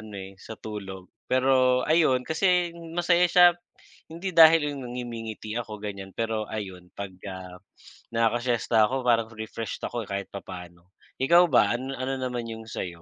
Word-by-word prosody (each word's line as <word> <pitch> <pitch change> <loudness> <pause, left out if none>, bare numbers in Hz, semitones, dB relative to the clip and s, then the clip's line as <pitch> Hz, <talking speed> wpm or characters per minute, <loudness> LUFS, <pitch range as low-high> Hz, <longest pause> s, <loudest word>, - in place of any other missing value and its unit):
ano 110 -1 -11
eh, 95 - -12
sa 110 - -7
tulog. 95 -3 -7 0.3
Pero, 130 +1 +3 0.4
ayun 155 -6 +4
kasi 185 +4 +2 0.5
masaya 175 0 +4
siya 180 0 +8 0.6
hindi 170 +4 -5
dahil 160 +1 +9
yung 140 - -7
na - - -7
ngumingiti 115 -3 -6
ako 115 -3 -4
ganyan 100 -2 -6
pero 115 -1 -1 0.2
ayun 95 -4 -6
'pag, 100 -2 -6 0.3
ah, 90 -1 -10 0.6
nakakasiyesta 120 0 +1
ako 130 - -3
parang 115 -1 +3
refreshed 110 0 -6
ako 120 - -6
kahit 100 -1 -3
papaano. 90 -3 -9 0.4
Ikaw 170 +4 +7
ba, - - +7
ano 130 +2 -5
ano 135 +1 -2
naman 125 -2 -3
yung 110 0 -8
sa'yo? 85 -2 -5
115 Hz, 155 wpm, -26 LUFS, 100-130 Hz, 0.6 s, dahil